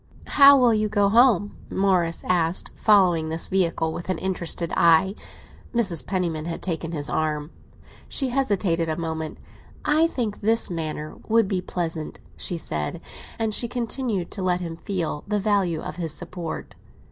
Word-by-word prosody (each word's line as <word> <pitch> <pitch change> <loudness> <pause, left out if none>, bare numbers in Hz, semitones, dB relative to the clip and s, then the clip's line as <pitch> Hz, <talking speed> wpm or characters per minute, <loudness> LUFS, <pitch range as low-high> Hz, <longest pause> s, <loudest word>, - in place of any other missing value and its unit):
"How 280 -1 +7
will 245 -3 +5
you 215 -1 +1
go 205 -1 +3
home?" 220 -3 +4
Morris 185 -4 +1
asked, 175 -1 0
following 180 -7 +4
this 160 +1 -1
vehicle 165 -4 +1
with 175 - -7
an 185 - 0
interested 175 -3 -2
eye. 170 +3 +5 0.6
Mrs. 195 -9 +1
Penniman 170 -5 -2
had 165 0 -5
taken 165 -2 -3
his 145 -4 -3
arm. 155 0 -1 0.6
She 270 -2 -1
hesitated 200 -10 0
a 155 - -1
moment. 160 -2 -4 0.5
"I 310 +2 +4
think 235 -10 -3
this 225 -1 +2
manner 155 -2 -4
would 225 -2 +3
be 190 -2 -1
pleasant," 165 -4 -4 0.2
she 175 - -3
said; 75 - -3 0.4
and 220 -1 -1
she 235 - +1
continued 235 -5 -2
to 200 - -6
let 180 -1 +1
him 170 -2 -5
feel 170 -6 -3
the 210 0 0
value 195 -5 +1
of - - -7
his 165 -3 -2
support. 170 +1 -6
180 Hz, 160 wpm, -24 LUFS, 165-210 Hz, 0.6 s, How